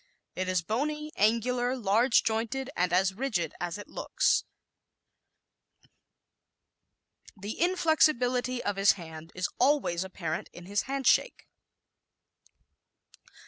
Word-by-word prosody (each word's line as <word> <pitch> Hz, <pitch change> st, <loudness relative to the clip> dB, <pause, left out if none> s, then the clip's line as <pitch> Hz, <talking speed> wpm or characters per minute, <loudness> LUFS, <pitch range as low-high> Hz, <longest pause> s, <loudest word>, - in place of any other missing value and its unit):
It 185 Hz, 0 st, -2 dB
is 185 Hz, -2 st, +1 dB
bony, 300 Hz, -, -2 dB
angular, 245 Hz, +4 st, +1 dB
large 230 Hz, +2 st, +3 dB
jointed 235 Hz, +4 st, -2 dB
and 180 Hz, -1 st, +1 dB
as 185 Hz, +2 st, +2 dB
rigid 220 Hz, -5 st, -2 dB
as 175 Hz, 0 st, -3 dB
it 205 Hz, -, -9 dB
looks. -, -, +1 dB, 2.9 s
The 205 Hz, +7 st, -6 dB
inflexibility 255 Hz, -8 st, +2 dB
of 205 Hz, -1 st, -2 dB
his 195 Hz, +1 st, +5 dB
hand 165 Hz, -2 st, -10 dB
is 185 Hz, 0 st, -1 dB
always 255 Hz, -, +2 dB
apparent 175 Hz, -4 st, -5 dB
in 175 Hz, -, -11 dB
his 200 Hz, +2 st, -1 dB
handshake. 275 Hz, -, +1 dB
220 Hz, 100 wpm, -29 LUFS, 185-260 Hz, 2.9 s, his